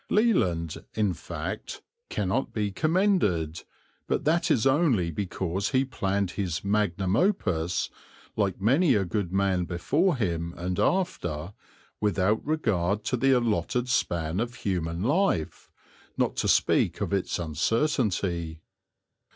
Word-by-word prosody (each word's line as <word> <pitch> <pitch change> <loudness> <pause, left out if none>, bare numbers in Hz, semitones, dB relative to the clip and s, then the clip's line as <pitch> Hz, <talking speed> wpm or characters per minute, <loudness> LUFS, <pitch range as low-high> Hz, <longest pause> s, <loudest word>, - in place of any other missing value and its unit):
Leland, 90 - +1
in 105 -4 +1
fact, 80 - -6 0.3
cannot 105 +6 -1
be 105 -2 -1
commended, 130 - +1 0.5
but - - -1
that 170 +3 +2
is 120 -8 +2
only 135 - +3
because 95 +2 -2
he 130 +1 +2
planned 100 -7 -1
his 90 -6 -3
magnum 100 -2 +1
opus, 90 - 0 0.4
like 100 -4 0
many 135 - +4
a 100 -2 +1
good 90 0 -2
man 95 -2 +1
before 145 - +1
him 85 -6 -2
and 90 +1 -3
after, 90 - -1 0.5
without 105 0 +1
regard 105 - 0
to 125 - 0
the 135 +2 +2
allotted 125 0 +1
span 85 -7 0
of 120 +1 -2
human 85 -5 -2
life, 140 - 0 0.5
not - - +1
to - - 0
speak - - +3
of - - -2
its 95 -2 0
uncertainty. 90 - 0
100 Hz, 125 wpm, -27 LUFS, 85-130 Hz, 0.5 s, many